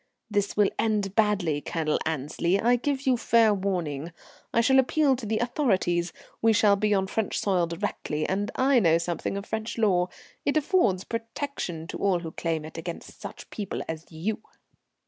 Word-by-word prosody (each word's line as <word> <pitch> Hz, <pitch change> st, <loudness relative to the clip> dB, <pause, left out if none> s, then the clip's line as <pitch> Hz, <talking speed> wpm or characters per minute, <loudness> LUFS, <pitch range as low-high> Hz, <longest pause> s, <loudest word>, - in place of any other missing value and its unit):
"This 205 Hz, -1 st, 0 dB
will 205 Hz, -2 st, +4 dB
end 210 Hz, -3 st, +1 dB
badly, 200 Hz, -9 st, +2 dB
Colonel 155 Hz, -1 st, -1 dB
Annesley. 160 Hz, +5 st, 0 dB
I 240 Hz, +3 st, +4 dB
give 275 Hz, +2 st, -2 dB
you 255 Hz, -2 st, +3 dB
fair 230 Hz, -2 st, +4 dB
warning. 175 Hz, -6 st, -2 dB, 0.4 s
I -, -, +2 dB
shall 265 Hz, +3 st, +5 dB
appeal 275 Hz, +1 st, +3 dB
to 245 Hz, -3 st, -6 dB
the 220 Hz, +1 st, 0 dB
authorities. 190 Hz, -, +1 dB, 0.3 s
We 225 Hz, 0 st, +5 dB
shall 205 Hz, -1 st, +5 dB
be 210 Hz, +1 st, 0 dB
on 195 Hz, -2 st, +3 dB
French 210 Hz, +2 st, -2 dB
soil 180 Hz, -4 st, +1 dB
directly, 165 Hz, -3 st, -3 dB
and 200 Hz, +2 st, -1 dB
I 260 Hz, 0 st, +4 dB
know 165 Hz, -6 st, +4 dB
something 170 Hz, +3 st, -2 dB
of 200 Hz, -, -5 dB
French 220 Hz, +2 st, -4 dB
law. 185 Hz, -5 st, +3 dB, 0.4 s
It 285 Hz, -, +1 dB
affords 280 Hz, -, +2 dB
protection 230 Hz, -, -4 dB
to 165 Hz, -, -6 dB
all 190 Hz, -3 st, +2 dB
who 165 Hz, -2 st, -6 dB
claim 160 Hz, -2 st, -2 dB
it 160 Hz, +1 st, -8 dB
against 170 Hz, 0 st, -8 dB
such -, -, -8 dB
people 205 Hz, -3 st, -4 dB
as 160 Hz, +1 st, -6 dB
you." 200 Hz, +7 st, -3 dB
200 Hz, 175 wpm, -27 LUFS, 170-230 Hz, 0.4 s, shall